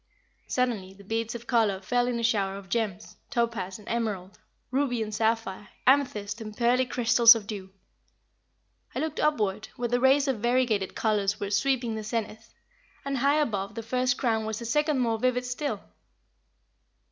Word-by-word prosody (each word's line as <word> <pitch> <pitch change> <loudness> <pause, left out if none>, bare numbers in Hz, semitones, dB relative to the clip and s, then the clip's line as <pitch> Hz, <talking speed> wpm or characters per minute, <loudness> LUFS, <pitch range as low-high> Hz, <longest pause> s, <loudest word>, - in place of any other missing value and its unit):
Suddenly 220 -7 -1
the 200 - -15
beads 225 +3 -2
of 235 0 -7
color 225 -6 +2
fell 245 +6 0
in 240 -1 -1
a - - -3
shower 200 -4 +1
of 195 -2 -11
gems, 215 -5 -2
topaz 230 -6 -1
and 210 - -16
emerald, 210 -5 -3 0.3
ruby 255 -4 0
and 215 0 -6
sapphire, 220 -2 -1 0.2
amethyst 235 -6 +2
and 215 -1 -8
pearly 245 +1 +3
crystals 235 -1 +6
of 220 -3 -5
dew. 200 -3 -6 1.3
I - - -1
looked 315 -1 -3
upward, 215 -9 0
where 240 -1 -2
the 245 +1 +2
rays 270 +2 +4
of 260 -5 0
variegated 235 -4 +1
colors 205 -2 +1
were 200 0 -3
sweeping 245 +1 +1
the 220 0 -4
zenith, 220 0 -4 0.5
and 275 -1 -1
high 280 +4 +3
above 205 -8 -1
the 230 - -5
first 250 +2 0
crown 225 -4 +1
was 220 -1 -3
a 235 - -6
second 300 +5 +1
more 230 -3 +1
vivid 250 +1 +1
still. 250 -3 -3
230 Hz, 170 wpm, -27 LUFS, 210-250 Hz, 1.3 s, crystals